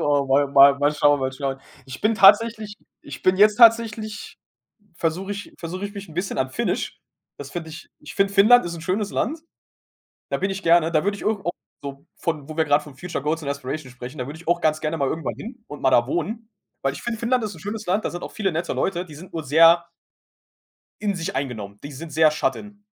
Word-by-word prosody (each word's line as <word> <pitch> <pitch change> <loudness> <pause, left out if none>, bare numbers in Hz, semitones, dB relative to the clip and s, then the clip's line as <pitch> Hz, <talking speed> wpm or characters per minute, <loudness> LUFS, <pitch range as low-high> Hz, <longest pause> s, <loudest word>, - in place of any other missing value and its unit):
Oh, 145 -1 +1
mal 140 +1 +3
mal 140 0 +7
mal 145 +1 +2
schauen, 145 -1 +3
mal 130 0 -1
schauen. 135 0 -4 0.2
Ich 130 -1 -9
bin 220 +2 +2
tatsächlich 210 +2 +5 0.3
ich - - -10
bin 185 0 +3
jetzt 210 +1 +5
tatsächlich 225 -2 +3 0.6
versuche 175 +5 -2
ich 205 0 -8
versuche 180 +4 -5
ich 205 - -6
mich 200 -2 -8
'n 160 - -13
bisschen 175 -1 -3
an 130 0 0
Finnisch. - - -2 0.4
Das 140 -1 -9
finde 160 -1 -6
ich 160 +2 -11
ich 150 - -11
finde, 195 0 +1
Finnland 215 +5 +6
ist 170 -1 -4
'n 165 - -8
schönes 195 +4 -2
Land. 305 +8 -2 0.9
Da - - -1
bin 195 - -1
ich 195 +1 -5
gerne, 165 -1 +4
da 155 - +2
würde 200 0 0
ich - - -10
ir - - +1
auch 195 -5 -2 0.3
so 140 +2 -8
von 155 -4 -3
wo 155 - -8
wir 160 - +2
grad 145 0 +3
von 150 -3 -13
Future 170 -1 -5
Goals 155 +2 -1
und 140 - -5
Inspiration 140 0 -5
sprechen, 125 +3 -9
da 125 - -3
würde 150 +3 -8
ich 170 - -12
auch 175 0 +2
ganz 155 -1 +1
gerne 155 +1 -2
mal 140 -3 0
irgendwann 160 +3 -3
hin 240 +1 -10
und 145 - -9
mal 130 - +4
da 120 -1 +4
wohnen, 215 - -3 0.3
weil 135 - 0
ich 140 - -9
finde, 235 -1 -3
Finnland 235 +1 0
ist 210 -2 -5
'n 165 - -13
schönes 210 +4 -6
Land. 195 +5 0
Da - - -1
sind 175 - -7
auch - - -7
viele 195 -5 -1
nette 170 +2 -2
Leute, 180 -2 -1
die 155 -5 -13
sind 170 +5 -12
nur 165 -1 -4
sehr 165 +4 +5 1.1
in 205 -1 -1
sich 165 -3 -4
eingenommen, 105 -7 -5
die 145 - -8
sind 155 +4 -8
sehr 155 0 +5
shut 150 - -1
in. 205 0 -12
165 Hz, 240 wpm, -23 LUFS, 145-205 Hz, 1.1 s, mal